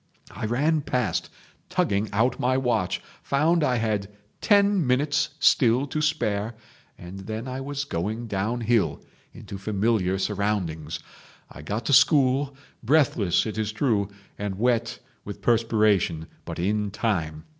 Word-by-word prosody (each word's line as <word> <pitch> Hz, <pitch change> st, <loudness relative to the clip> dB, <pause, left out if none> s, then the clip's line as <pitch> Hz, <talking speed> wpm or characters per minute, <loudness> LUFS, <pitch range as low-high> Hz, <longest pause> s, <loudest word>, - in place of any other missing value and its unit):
I 110 Hz, -, -4 dB
ran 150 Hz, +7 st, +1 dB
past 125 Hz, -2 st, -1 dB, 0.4 s
tugging 100 Hz, +2 st, 0 dB
out 120 Hz, +5 st, +1 dB
my 130 Hz, +1 st, +2 dB
watch, 120 Hz, -9 st, 0 dB, 0.2 s
found 155 Hz, +4 st, +2 dB
I 130 Hz, -4 st, +2 dB
had 105 Hz, -4 st, -1 dB, 0.3 s
ten 200 Hz, -, +3 dB
minutes 140 Hz, +3 st, +1 dB
still 125 Hz, -1 st, +4 dB
to 150 Hz, +2 st, -3 dB
spare, 115 Hz, -8 st, -1 dB, 0.4 s
and 90 Hz, +3 st, -9 dB
then 110 Hz, +3 st, -4 dB
I 130 Hz, +1 st, -4 dB
was 140 Hz, +1 st, -3 dB
going 110 Hz, -1 st, -3 dB
downhill 110 Hz, -3 st, 0 dB, 0.3 s
into 100 Hz, -, -9 dB
familiar 100 Hz, -2 st, 0 dB
surroundings. 95 Hz, -6 st, -2 dB, 0.5 s
I -, -, -10 dB
got 105 Hz, +9 st, -4 dB
to 140 Hz, -, +1 dB
school, 135 Hz, -1 st, +4 dB, 0.3 s
breathless, 120 Hz, -, +2 dB
it 110 Hz, 0 st, -4 dB
is 110 Hz, -1 st, -1 dB
true, 110 Hz, -4 st, 0 dB, 0.3 s
and 100 Hz, -2 st, -3 dB
wet 120 Hz, +1 st, +1 dB, 0.3 s
with 100 Hz, -, -8 dB
perspiration, 110 Hz, -8 st, +2 dB, 0.2 s
but -, -, -6 dB
in 105 Hz, +3 st, 0 dB
time. 85 Hz, -8 st, -2 dB
115 Hz, 135 wpm, -25 LUFS, 100-130 Hz, 0.5 s, still